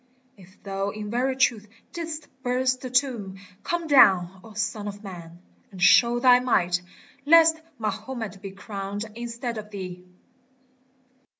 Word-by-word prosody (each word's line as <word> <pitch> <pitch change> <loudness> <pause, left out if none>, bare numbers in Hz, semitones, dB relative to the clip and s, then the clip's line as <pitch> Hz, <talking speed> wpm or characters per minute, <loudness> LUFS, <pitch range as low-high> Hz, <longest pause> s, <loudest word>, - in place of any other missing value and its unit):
If 190 0 -18
thou 195 0 -3
in 210 0 -6
very 255 +3 0
truth 235 -5 +1 0.3
didst 325 -2 -6
burst 255 0 0
the 255 - -6
tomb 245 -7 -1 0.2
Come 345 -1 -2
down, 190 - +5
O 220 - -13
Son 210 0 -3
of 205 +1 -8
Man! 170 -4 -10 0.3
and 190 - -11
show 235 +6 +5
thy 250 0 +6
might, 180 -8 +1 0.4
Lest 320 +1 +6 0.2
Mahomet 220 -2 -5
be 195 - -6
crowned 200 +1 -6
instead 235 0 -5
of 210 0 -10
thee 180 -3 -7
215 Hz, 135 wpm, -25 LUFS, 195-255 Hz, 0.4 s, thy